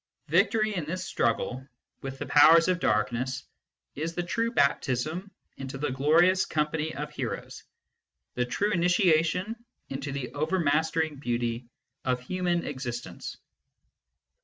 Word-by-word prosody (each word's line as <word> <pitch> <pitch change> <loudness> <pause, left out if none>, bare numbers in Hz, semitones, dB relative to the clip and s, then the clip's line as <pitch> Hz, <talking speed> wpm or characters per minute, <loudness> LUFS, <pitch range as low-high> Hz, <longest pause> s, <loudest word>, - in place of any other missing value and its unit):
Victory, 215 -2 +3
in 175 -6 -2
this 185 +4 -4
struggle 125 0 -1 0.4
with 135 0 -6
the - - -5
powers 160 +3 +7
of 180 -1 +1
darkness, 120 +2 0 0.5
is 160 +3 -4
the 175 - -1
true 230 +6 -1
baptism 155 - 0 0.3
into 135 0 -6
the 145 0 -2
glorious 165 +8 +4
company 155 +1 -1
of 150 +1 -5
heroes, - - -5 0.7
the 125 - 0
true 205 +11 0
initiation 180 +1 +2 0.3
into 135 +1 -4
the 130 -3 -5
overmastering 155 0 +1
beauty 120 -2 -2 0.4
of 125 -1 0
human 175 +5 -1
existence. 125 -4 -5
150 Hz, 120 wpm, -28 LUFS, 130-175 Hz, 0.7 s, powers